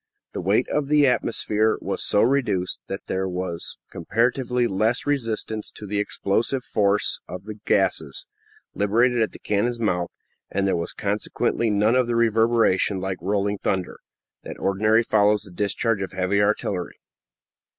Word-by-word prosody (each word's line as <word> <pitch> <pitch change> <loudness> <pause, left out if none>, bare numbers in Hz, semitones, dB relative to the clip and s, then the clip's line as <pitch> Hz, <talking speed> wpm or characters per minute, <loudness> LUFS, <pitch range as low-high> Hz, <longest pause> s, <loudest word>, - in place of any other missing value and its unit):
The - - -4
weight 100 +7 +2
of 150 -2 0
the 150 0 +4
atmosphere 110 -3 +1
was - - -2
so 105 - +3
reduced 120 -8 +1
that 95 - -6
there 95 0 -2
was 90 -2 -4
comparatively 125 +6 0
little 110 +3 +1
resistance 115 -6 -2
to 105 - -9
the 100 0 -2
explosive 115 +5 -1
force 105 -3 +1
of 90 +1 -7
the 110 0 -8
gases, 85 -8 +1 0.5
liberated 120 +4 +2
at 110 - +1
the - - -10
cannon's 115 +4 -1
mouth, 90 -6 0 0.4
and 100 0 -1
there 95 - +2
was 85 -1 -3
consequently 105 +3 -1
none 105 +2 +3
of 125 -1 +3
the 120 - -1
reverberation, 115 -4 +2
like 95 0 -3
rolling 100 +2 -1
thunder, 95 -2 -2 0.4
that - - -8
ordinarily 110 +4 +2
follows 105 -1 +3
the 100 - -12
discharge 105 +3 0
of 95 - -4
heavy 95 +2 +1
artillery. 100 -3 -1
105 Hz, 150 wpm, -23 LUFS, 95-115 Hz, 0.5 s, the